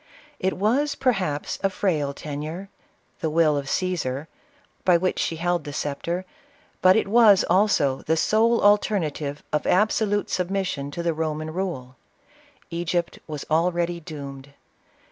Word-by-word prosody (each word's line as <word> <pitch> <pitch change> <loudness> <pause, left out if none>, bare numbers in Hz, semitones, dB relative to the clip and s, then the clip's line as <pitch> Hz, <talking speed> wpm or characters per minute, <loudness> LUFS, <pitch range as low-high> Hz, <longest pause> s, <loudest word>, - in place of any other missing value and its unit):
It 190 +1 0
was, 265 +9 +1
per 260 -1 +2
haps, 180 -10 -3
a 195 - +2
frail 160 -7 0
tenure 155 +6 -6 0.3
— - - -41
the 160 - 0
will 155 -1 +3
of 140 -1 -3
Cassar 155 -5 -2 0.3
— - - -36
by 180 -2 +5
which 185 +2 -1
she 165 - -1
held 175 0 0
the 145 - -7
sceptre; 170 +6 -3 0.6
but 185 0 +6
it 220 - +2
was, 210 -2 +6
also, 180 -9 +3
the 160 +1 0
sole 225 +6 +3
alternative 165 -8 +1
of 150 - 0
absolute 205 +1 +2
submission 185 -6 -1
to 170 +4 -5
the 170 -1 +1
Roman 155 0 -3
rule. 160 -9 -4 0.7
Egypt 170 0 -2
was 150 -3 -6
already 170 +1 +1
doomed. 140 -3 -9
170 Hz, 145 wpm, -24 LUFS, 150-195 Hz, 0.7 s, but